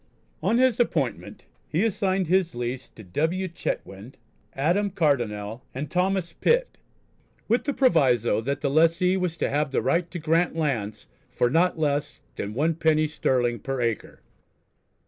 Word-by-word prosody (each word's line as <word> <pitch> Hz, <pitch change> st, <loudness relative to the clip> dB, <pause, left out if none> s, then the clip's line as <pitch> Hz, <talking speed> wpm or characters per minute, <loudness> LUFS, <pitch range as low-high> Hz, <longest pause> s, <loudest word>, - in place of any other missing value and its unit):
On 205 Hz, +8 st, +2 dB
his 255 Hz, -2 st, +3 dB
appointment 150 Hz, -, -1 dB, 0.2 s
he 175 Hz, +8 st, +1 dB
assigned 190 Hz, -3 st, 0 dB
his 180 Hz, -2 st, +1 dB
lease 120 Hz, +2 st, -4 dB
to 110 Hz, -, -14 dB
W. 160 Hz, -, -1 dB
Chetwynd, 115 Hz, -, -5 dB, 0.4 s
Adam 175 Hz, +9 st, +1 dB
Cardonnel, 120 Hz, -, -1 dB
and 140 Hz, +2 st, -5 dB
Thomas 185 Hz, -1 st, 0 dB
Pitt, -, -, +1 dB, 0.7 s
with 235 Hz, +3 st, +1 dB
the 285 Hz, -, 0 dB
proviso 130 Hz, -, +3 dB
that 140 Hz, +4 st, -3 dB
the 140 Hz, -, 0 dB
lessee 165 Hz, +4 st, +3 dB
was 180 Hz, -3 st, -2 dB
to -, -, 0 dB
have 150 Hz, +1 st, 0 dB
the 135 Hz, -, 0 dB
right 170 Hz, 0 st, 0 dB
to 175 Hz, -, -6 dB
grant 165 Hz, +1 st, +1 dB
lands 115 Hz, -10 st, -2 dB, 0.2 s
"for 120 Hz, -, 0 dB
not 175 Hz, +4 st, +2 dB
less 145 Hz, -2 st, -1 dB, 0.2 s
than 105 Hz, +2 st, -5 dB
1_d._ 155 Hz, +1 st, +2 dB
sterling 125 Hz, -5 st, 0 dB
per 135 Hz, +4 st, -4 dB
acre." 115 Hz, -2 st, -3 dB
155 Hz, 145 wpm, -25 LUFS, 125-180 Hz, 0.7 s, his